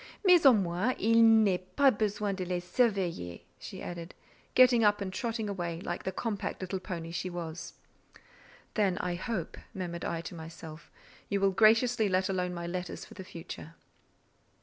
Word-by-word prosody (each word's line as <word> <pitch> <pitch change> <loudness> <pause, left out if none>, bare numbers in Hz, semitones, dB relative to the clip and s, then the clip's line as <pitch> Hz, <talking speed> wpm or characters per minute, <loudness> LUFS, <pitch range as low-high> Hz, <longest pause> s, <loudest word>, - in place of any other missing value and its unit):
Mais 355 -5 +7
au 265 - +9
moins 195 +4 0
il 230 +1 +4 0.2
n'est 185 -3 +1
pas 280 -2 +6
besoin 210 -2 -1
de 190 -1 -3
les 180 0 -2
surveiller," 180 - -1 0.2
she - - -8
added, 170 0 -7 0.4
getting 250 -2 +6
up 205 -1 +4
and 190 -2 -4
trotting 225 0 -2
away 175 -4 -3
like 175 -2 -4
the 190 - -2
compact 205 +1 -3
little 190 0 -3
pony 170 -3 -6
she 180 +2 -3
was. 170 -2 -6 1.0
"Then 195 -4 +1
I 180 - -2
hope," 185 0 -4 0.2
murmured 175 -2 -4
I 165 - -2
to 170 - -8
myself, 160 -1 -10 0.4
"you 200 - +1
will 195 0 +3
graciously 225 +2 +4
let 185 0 +1
alone 180 -1 -1
my 170 0 -5
letters 180 +1 -5
for - - -14
the 190 - -8
future." 165 -2 -9
185 Hz, 170 wpm, -30 LUFS, 175-215 Hz, 1.0 s, au